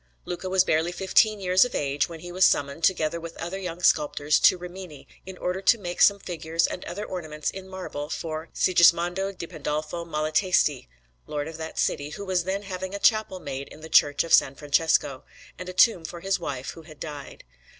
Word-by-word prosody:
Luca 180 +1 -5
was 185 0 +4
barely 160 0 +1
fifteen 200 +3 +2
years 185 -1 +4
of 250 - -3
age 140 +1 0
when 165 -2 -9
he 175 +1 -8
was 185 +2 +1
summoned, 140 +1 +2
together 170 -2 +1
with 165 0 -9
other 175 +3 -5
young 180 -2 -6
sculptors, 150 -1 +3
to - - +5
Rimini, 180 -4 -10 0.2
in 190 -1 -8
order 180 +2 -3
to 230 - +4
make 175 -4 -5
some 200 - +6
figures 165 -3 -2
and - - -4
other 205 +4 -5
ornaments 155 -4 -4
in 190 0 -9
marble 180 -6 -6
for 160 0 -5
Sigismondo 175 +2 +3
di 180 -3 -7
Pandolfo 155 +2 -4
Malatesti, 155 - +1 0.4
Lord 145 0 -3
of 160 0 -8
that 160 0 -7
city, 145 +1 -1
who 200 +7 -7
was 185 -2 0
then 195 +2 -2
having 190 0 -5
a - - -4
chapel 215 -4 +2
made 140 -3 -6
in 155 - -14
the 160 - -9
Church 145 -2 +4
of 165 - -8
S. - - +9 0.2
Francesco, 145 -2 +1 0.4
and 180 0 -6
a - - -6
tomb 180 -2 +4
for 170 +1 -8
his 195 +1 0
wife, 140 -5 -5
who 165 - -12
had 155 -2 -15
died. 145 -3 -8
170 Hz, 200 wpm, -25 LUFS, 155-185 Hz, 0.4 s, S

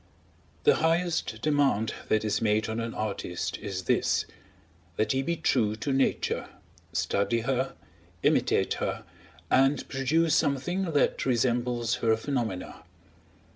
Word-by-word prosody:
The 445 - +5
highest 165 0 0
demand 140 -8 +2 0.2
that 110 0 +2
is 105 - 0
made 110 0 +2
on 110 +1 -2
an 115 0 -4
artist 90 -5 -3
is 95 -2 -4
this: - - +1 0.7
that 110 +2 +1
he 135 - +1
be 170 +5 -1
true 120 -9 +1
to 135 +5 -2
Nature, 135 0 0 0.4
study 115 +4 0
her, 130 +2 -1 0.5
imitate - - +2
her, - - -2 0.5
and 135 +2 +3
produce 150 +5 +1
something 165 +5 0
that 145 - +2
resembles 120 -1 +1
her 110 -1 +2
phenomena. 115 -7 -3
125 Hz, 125 wpm, -28 LUFS, 110-145 Hz, 0.7 s, The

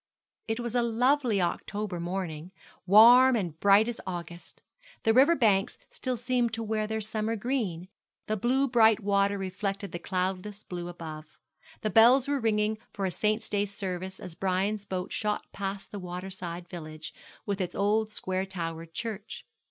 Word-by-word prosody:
It 225 +1 -2
was 235 -1 -4
a 245 - +3
lovely 240 0 +2
October 200 +1 -3
morning, 175 -2 -4 0.4
warm 240 +6 +8
and 175 -8 -3
bright 200 +3 +5
as 240 -1 -4
August. 175 -1 -7 0.4
The 225 - +4
river 280 +8 +6
banks 215 -5 +2
still 255 -2 -3
seemed 240 -1 0
to 225 - -4
wear 215 -1 -1
their 220 0 -2
summer 215 +1 -1
green, 205 -7 -2 0.4
the 215 - -1
blue 255 +6 +1
bright 225 -3 +4
water 200 0 +2
reflected 195 +1 -4
the 175 - -5
cloudless 190 +3 -3
blue 175 -1 -6
above. 155 -3 -9 0.4
The 215 - -1
bells 245 +4 +6
were 285 -1 0
ringing 215 -1 +1
for 195 - -3
a 185 - -1
saint's 215 +4 0
day 205 0 0
service 190 -2 -5
as 180 - -8
Brian's 195 +3 -1
boat 185 -1 -4
shot 210 -1 -1
past 195 0 -5
the 205 - -6
water 180 +1 -6
side 175 -2 -6
village, 155 -3 -8 0.3
with 200 -1 -2
its 180 - -3
old 210 +2 +1
square 190 -2 -3
towered 165 -3 -6
church. 225 -3 -6
200 Hz, 165 wpm, -28 LUFS, 185-225 Hz, 0.4 s, warm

